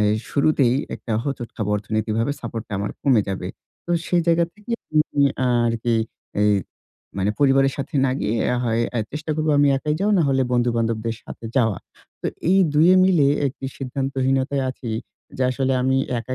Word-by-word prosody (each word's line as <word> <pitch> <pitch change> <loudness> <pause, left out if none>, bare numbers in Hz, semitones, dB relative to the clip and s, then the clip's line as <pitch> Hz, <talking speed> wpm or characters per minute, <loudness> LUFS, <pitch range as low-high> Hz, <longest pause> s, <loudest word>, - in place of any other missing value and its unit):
এই 105 0 +3 0.2
শুরুতেই 140 -4 +3 0.2
একটা 115 - -6
হোঁচট 135 -4 -3
খাবো, 105 -2 -2
অর্থনীতিকভাবে 110 +4 -1
সাপোর্ট 115 -2 -5
টা - - -10
আমার 100 - -2
কমে 130 -6 +4
যাবে। 95 -2 -3 0.4
তো - - -5 0.2
সেই 175 -1 +3
জায়গা 170 0 +4
থেকে 210 +3 -8 0.2
উ - - +1 0.2
উম 140 - +5 0.4
আরকি, 115 0 0 0.5
এই 105 0 +4 0.7
মানে 100 +2 +1
পরিবারের 135 -1 +4
সাথে 140 +1 -6
না 135 - +2
গিয়ে 110 +2 0 0.3
হয় 115 0 +1
আ - - +1
চেষ্টা 155 +1 -4
করব 155 0 -1
আমি 145 0 +5
একাই 150 +2 -1
যাওয়া, 210 +2 +2
নাহলে 135 -4 +2
বন্ধু-বান্ধবদের 115 -2 0
সাথে - - -10
যাওয়ার। 110 -7 +1 0.4
তো - - -3 0.2
এই 190 - +5 0.2
দুইয়ে 165 +5 +6
মিলে 175 -7 +4 0.2
একটি 135 0 -6
সিদ্ধান্তহীনতায় 135 +1 -1
আছি, 120 -2 -7 0.5
যে 130 - -1
আসলে 130 +1 0
আমি 130 +1 +2 0.2
একা 130 +2 -5
130 Hz, 170 wpm, -22 LUFS, 115-145 Hz, 0.7 s, দুইয়ে